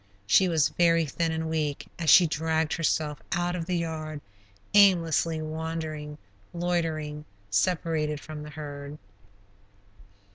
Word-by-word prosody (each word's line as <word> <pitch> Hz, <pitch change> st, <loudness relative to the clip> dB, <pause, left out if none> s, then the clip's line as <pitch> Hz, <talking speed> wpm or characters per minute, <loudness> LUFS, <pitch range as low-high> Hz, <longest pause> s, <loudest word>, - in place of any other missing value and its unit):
She 185 Hz, -, +5 dB
was 160 Hz, -3 st, +3 dB
very 165 Hz, -1 st, +3 dB
thin 165 Hz, +3 st, -1 dB
and 160 Hz, 0 st, -2 dB
weak 155 Hz, -3 st, -2 dB
as 165 Hz, -2 st, 0 dB
she 180 Hz, -, +8 dB
dragged 160 Hz, 0 st, 0 dB
herself 155 Hz, -3 st, -1 dB
out 175 Hz, 0 st, 0 dB
of 170 Hz, -2 st, -4 dB
the 180 Hz, -1 st, 0 dB
"yard," 155 Hz, -2 st, -4 dB, 0.5 s
aimlessly 165 Hz, -5 st, +4 dB
wandering, 155 Hz, -1 st, -5 dB, 0.4 s
loitering, 160 Hz, -4 st, -2 dB, 0.3 s
separated 150 Hz, -, 0 dB
from 155 Hz, 0 st, -8 dB
the 150 Hz, -, -8 dB
herd. 145 Hz, -1 st, -8 dB
160 Hz, 120 wpm, -27 LUFS, 150-165 Hz, 0.5 s, she